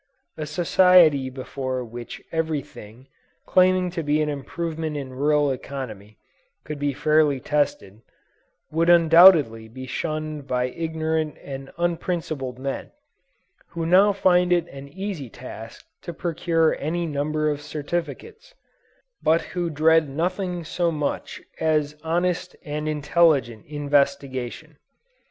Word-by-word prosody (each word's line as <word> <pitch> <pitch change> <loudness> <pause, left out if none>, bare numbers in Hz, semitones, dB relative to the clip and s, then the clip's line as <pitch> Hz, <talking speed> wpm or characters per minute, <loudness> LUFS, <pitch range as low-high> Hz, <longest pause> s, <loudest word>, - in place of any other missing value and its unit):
A 155 -1 -5
society 165 -3 +4
before 130 0 -4
which 120 +1 -9
every 160 -3 -1
thing, 115 +6 -14 0.4
claiming 185 -1 +3
to 170 - -3
be 150 0 +1
an 155 -1 0
improvement 155 +2 -4
in 135 -2 -6
rural 145 +1 +2
economy, 115 -6 -7 0.5
could 150 -2 -6
be 145 0 0
fairly 150 0 +2
tested, 125 -8 -2 0.7
would 165 +2 +1
undoubtedly 165 -9 +6
be 130 +3 -9
shunned 155 +1 -4
by 125 -1 0
ignorant 160 0 -2
and 135 -1 -7
unprincipled 165 -6 -2
men, 135 +1 -5 0.8
who 170 -1 -4
now 190 +5 +5
find 180 -2 +3
it 175 -1 +2
an 140 0 -10
easy 180 - -6
task 115 -2 -10 0.2
to 170 - -7
procure 165 -1 +1
any 170 +4 -2
number 155 0 -1
of 145 0 -4
certificates, 170 - -5 0.7
but 160 +1 +3
who 175 -2 -1
dread 160 0 +3
nothing 180 +4 -2
so 170 +2 -1
much 150 -2 -4 0.2
as 150 -2 +1
honest 175 +2 -1
and 150 0 -3
intelligent 150 -6 +2
investigation. 140 -1 -1
155 Hz, 120 wpm, -24 LUFS, 140-170 Hz, 0.8 s, undoubtedly